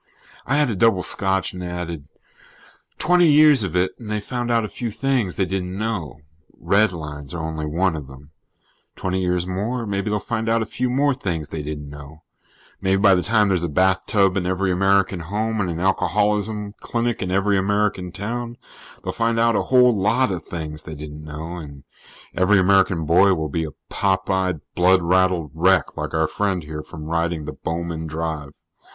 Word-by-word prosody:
I 135 - +1
had 145 -5 +2
a - - -2
double 95 -2 +3
scotch 95 -1 +1
and 90 0 -6
added: 85 -4 -5 0.9
"Twenty 175 0 +4
years 150 -4 +6
of 90 -3 -3
it 90 +1 +2
and 115 -3 -9
they 105 0 -1
found 120 +3 -4
out 115 -2 +2
a - - -3
few 120 +2 -4
things 125 -5 -1
they 95 - +1
didn't 95 0 -3
know. 90 - -3 0.4
Redlines 80 -8 0
are 80 - -4
only 80 -1 -4
one 85 +3 +1
of 75 -4 -7
them. 70 +2 -14 0.6
Twenty 95 0 -2
years 90 -1 0
more, 110 +7 -2
maybe 100 0 -2
they'll 105 - +1
find 115 +1 -3
out 115 0 +2
a - - -5
few 125 +3 -2
more 140 +3 +2
things 85 - -4
they 80 - -4
didn't 75 -1 -6
know. 75 +2 -12 0.6
Maybe 95 0 +2
by 100 -1 +6
the 90 - +2
time 105 0 +2
there's 90 -3 +1
a 85 - -1
bathtub 95 +3 +2
in 90 -2 -1
every 95 +1 0
American 95 0 +2
home 105 +6 -2
and 90 - -1
an 85 -1 -3
alcoholism 105 +2 0
clinic 120 0 -2
in 95 - -2
every 100 +2 +2
American 100 -2 0
town, 120 +5 -5 0.5
they'll - - -3
find 115 0 0
out 115 0 +3
a - - +2
whole 125 -2 +5
lot 110 +4 +2
of 90 -2 -3
things 80 -2 -6
they 80 - -8
didn't 75 +1 -9
know. 80 +3 -7
And 70 -4 -10 0.5
every 95 +3 +4
American 95 -3 +3
boy 95 +5 +5
will 80 -2 -3
be 80 +3 -2
a 75 - -6 0.2
pop 95 -1 0
eyed, 95 -5 0
blood 90 0 +4
raddled 90 -3 +2
wreck, 90 0 +2
like - - -4
our 80 0 +3
friend 95 0 -1
here, 75 0 -6
from 80 0 -10
riding 85 -1 -1
the - - -5
Bowman 80 -1 -4
Drive." 80 -2 -4
95 Hz, 190 wpm, -22 LUFS, 80-105 Hz, 0.9 s, years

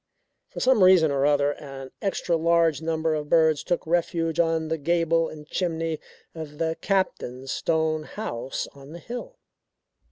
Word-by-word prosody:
For - - -7
some 255 -6 +4
reason 180 -5 +6
or 140 0 +2
other, 145 -1 +3
an 135 -2 -9
extra 190 -3 0
large 165 -1 +2
number 160 0 0
of 150 -1 -3
birds 160 -3 +4
took 175 - -1
refuge 165 -1 0
on 165 -1 +1
the 160 0 -1
gable 165 +1 +1
and 150 -1 -10
chimney 165 -3 -2 0.3
of 155 -2 -8
the 160 0 0
Captain's 135 -9 -1
stone 160 -1 0
house 130 - -4
on 140 +2 -13
the 170 - -8
hill. 245 - -7
160 Hz, 155 wpm, -25 LUFS, 150-170 Hz, 0.3 s, reason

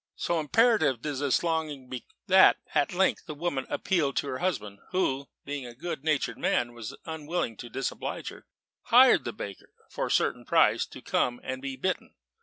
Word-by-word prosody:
So 170 -1 0
imperative 155 - +3
did 145 -3 -2
this 140 0 +1
longing 155 -5 -2
become, 125 -1 -7 0.2
that 190 0 +7 0.2
at 145 - +2
length 190 +2 +1
the 155 - -5
woman 145 -4 -2
appealed 155 -8 0
to - - 0
her 130 - -3
husband, 105 - -2
who 140 -7 0 0.2
(being 140 -3 -4
a 120 - -11
good 155 0 -5
natured 140 -6 0
man, 120 - +1
and 120 -1 -11 0.2
unwilling 160 -5 -3
to 120 - -8
disoblige 135 +2 -4
her) - - -14 0.4
hired - - +6
the - - -2
baker, 100 -2 -8 0.2
for - - -2
a - - -4
certain - - +1
price, - - +3
to - - -12
come 120 0 0
and 130 0 -4
be 135 -1 -4
bitten. 185 +8 -3
145 Hz, 185 wpm, -28 LUFS, 130-170 Hz, 0.4 s, that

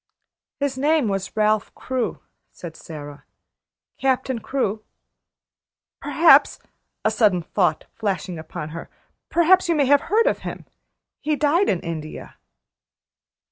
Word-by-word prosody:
"His 280 -2 -2
name 300 -2 +2
was 195 +1 -4
Ralph 215 -1 +2
Crewe," 255 -2 -3 0.3
said 165 -2 -10
Sara. 145 -2 -10 0.8
"Captain 260 -2 0
Crewe. 220 -4 -2 1.2
Perhaps," 315 -4 +5 0.5
a 220 - +3
sudden 205 -6 +2
thought 175 -3 0
flashing 185 -4 -3
upon 155 -1 -7
her, 165 +1 -8 0.4
"perhaps 345 +2 +4
you 335 - +3
may 290 -2 +3
have 285 +1 +4
heard 445 +5 +2
of - - +1
him? - - -7 0.5
He 305 +1 0
died 305 +7 +2
in 180 - 0
India." 160 -2 -7
225 Hz, 120 wpm, -22 LUFS, 175-290 Hz, 1.2 s, Perhaps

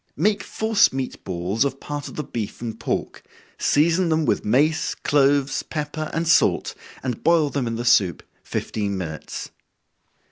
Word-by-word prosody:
Make 200 +6 +2
force 220 +2 +2
meat 130 -1 -4
balls 95 +5 -1
of 135 -1 -2
part 145 -1 -5
of - - -9
the 150 - -3
beef 115 -6 -5
and 115 -2 -5
pork, - - -3 0.4
season 165 +4 +3
them 160 -1 +2
with - - +1
mace, 145 +8 +2
cloves, 140 -1 +2
pepper, 155 0 -4
and 165 +1 -1
salt, 170 - +3 0.3
and 125 -4 -3
boil 160 -3 +3
them 135 -4 -1
in 115 - -2
the 120 +1 -4
soup 105 -7 +3 0.2
fifteen 100 -2 -3
minutes. 80 -4 -6
140 Hz, 155 wpm, -23 LUFS, 115-155 Hz, 0.4 s, season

